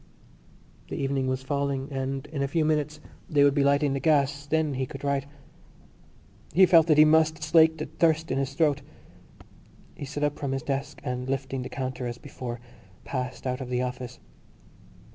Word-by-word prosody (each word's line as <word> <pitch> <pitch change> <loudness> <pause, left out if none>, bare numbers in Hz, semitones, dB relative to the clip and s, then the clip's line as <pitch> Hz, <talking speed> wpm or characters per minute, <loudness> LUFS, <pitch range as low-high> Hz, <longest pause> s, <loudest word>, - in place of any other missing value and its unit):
_ - - -23
The - - -4
evening 135 -1 -1
was 130 0 -2
falling 140 -1 -1
and 135 0 -3
in 145 -2 -5
a 140 - +1
few 155 +2 +1
minutes 150 -1 0 0.3
they 145 -2 +4
would 140 -1 +5
be 140 -1 +2
lighting 140 0 +3
the 135 - -1
gas: 145 -1 +1
then 155 -1 +1
he 130 0 -2
could 135 +2 -9
write. 140 -1 0 1.3
He 190 +1 +7
felt 165 -2 +6
that 155 -2 +4
he 155 - +9
must 155 0 +3
slake 160 +1 +5
the 155 - -3
thirst 160 -1 +1
in 135 - 0
his 135 0 -3
throat. 145 -3 +2 1.1
He - - -7
stood 145 +2 -4
up 145 -1 0
from 140 -2 -2
his 135 -1 -3
desk 140 0 -3
and, 125 +1 -3
lifting 135 -1 -2
the 125 - -6
counter 130 -2 -4
as 120 0 -5
before, 125 -3 -7 0.4
passed 130 -1 -4
out 125 0 -2
of 125 - -6
the 125 0 0
office. 125 -1 -5
140 Hz, 190 wpm, -27 LUFS, 130-150 Hz, 1.3 s, he